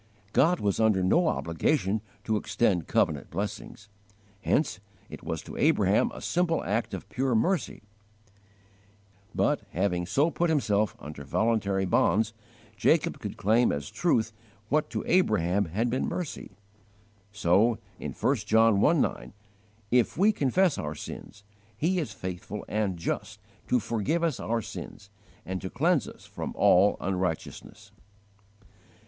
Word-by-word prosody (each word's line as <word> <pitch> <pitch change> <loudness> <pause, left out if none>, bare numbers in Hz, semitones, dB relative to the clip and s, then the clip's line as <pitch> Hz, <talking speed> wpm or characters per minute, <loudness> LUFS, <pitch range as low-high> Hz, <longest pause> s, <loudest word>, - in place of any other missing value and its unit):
God 170 +5 +4
was 100 -2 0
under 110 -4 +3
no 165 - +3
obligation 100 - 0 0.2
to 110 - 0
extend 100 -5 0
covenant - - +1
blessings; 100 +2 -5 0.5
hence 145 +3 0 0.3
it - - -8
was - - -4
to - - -9
Abraham - - +3
a - - -9
simple 175 -2 0
act 110 +4 -1
of - - -9
pure 130 -2 0
mercy; 165 - 0 1.5
but, - - +1
having 90 -1 0
so 145 - +2
put 175 +1 0
Himself 110 -9 +1
under 75 -1 -9
voluntary 100 - 0
bonds, 105 +4 +2 0.4
Jacob - - +2
could - - -6
claim 115 +4 +3
as 70 0 -4
truth 115 -10 +1 0.4
what 150 -4 +1
to 110 -3 -3
Abraham 100 - +2
had 110 +9 -1
been 130 - 0
mercy. 175 -5 -5 0.8
So 100 +4 +3 0.2
in - - -5
1 - - +1
John 110 -2 +3
i. 165 - +5
9: 155 - -1 0.6
"If 125 +1 +2
we 200 +5 +5
confess 175 - +1
our 75 0 -4
sins 105 +7 -9 0.3
He 180 +8 +1
is 155 - -3
faithful 95 +3 -6
and 105 -4 -1
just 85 - -4 0.3
to 125 - +3
forgive 120 +10 -1
us 160 -6 0
our 115 -1 -1
sins, 100 0 -9 0.3
And 95 0 -4
to 95 - -5
cleanse 160 - +1
us - - -12
from - - -6
all 100 +3 +5
unrighteousness." 90 -3 -4
110 Hz, 140 wpm, -28 LUFS, 95-140 Hz, 1.5 s, i